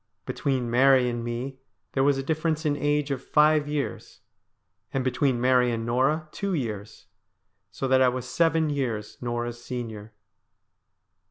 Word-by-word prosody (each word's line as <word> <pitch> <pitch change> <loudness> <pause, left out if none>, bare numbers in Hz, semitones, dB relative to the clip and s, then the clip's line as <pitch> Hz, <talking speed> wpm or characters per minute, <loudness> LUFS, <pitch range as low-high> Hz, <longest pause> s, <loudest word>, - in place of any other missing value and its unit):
Between 130 -3 -1
Mary 130 +1 +5
and 120 -1 -4
me 125 +3 -4 0.3
there 135 - +1
was 140 0 +3
a 135 - -2
difference 160 +1 -1
in 145 -1 +2
age 145 0 0
of 135 -1 -3
five 150 0 +3
years, 145 -8 -4 0.7
and 135 - -1
between 130 0 +1
Mary 125 0 +3
and 115 -1 -2
Norah 135 +7 +1
two 200 -2 -2
years, 110 -7 -5 0.6
so 135 +5 -4
that 130 0 +4
I 130 - +6
was 125 0 -4
seven 160 +3 +2
years 120 -7 -3
Norah's 120 0 -3
senior. 110 -4 -6
130 Hz, 150 wpm, -26 LUFS, 120-145 Hz, 0.7 s, I